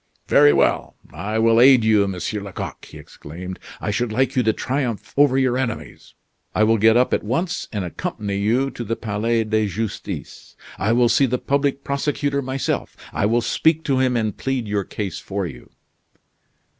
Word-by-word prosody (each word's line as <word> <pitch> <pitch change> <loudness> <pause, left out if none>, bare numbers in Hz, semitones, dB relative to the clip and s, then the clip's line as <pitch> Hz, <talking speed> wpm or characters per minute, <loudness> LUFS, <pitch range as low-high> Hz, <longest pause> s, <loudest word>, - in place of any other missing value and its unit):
"Very 75 - +6
well! - - +1 0.2
I 100 +8 -3
will 115 +1 +4
aid 130 -2 +7
you, 105 -2 +3
Monsieur 95 +2 -3
Lecoq," 100 -1 -7
he - - -12
exclaimed. 90 +5 -9 0.2
"I 105 - -2
should 120 +2 -1
like 130 +6 0
you 130 - +3
to 110 -2 +3
triumph 125 -3 -3
over 140 -2 +4
your 130 -1 +2
enemies. 120 -4 -5 0.4
I 110 - +3
will 110 0 +3
get 110 +2 +5
up 125 - +2
at - - +2
once 165 - -2
and 105 -4 -3
accompany 105 - -4
you 120 +7 +1
to 120 - -6
the 115 +1 -2
Palais 115 +2 -1
de 110 -1 0
Justice. 105 +3 -6 0.2
I 105 +3 +1
will 120 +1 +4
see 125 +4 +3
the 125 +1 0
public 140 +1 0
prosecutor 140 0 -1
myself; 130 0 -3 0.2
I 100 - +1
will 120 +2 +2
speak 160 +6 +1
to 135 -3 +1
him, 130 -2 +2
and 110 -3 -1
plead 130 -4 -2
your 100 -2 -1
case 100 -3 -5
for 100 -1 -4
you." 65 -8 -9
115 Hz, 180 wpm, -21 LUFS, 105-130 Hz, 0.4 s, aid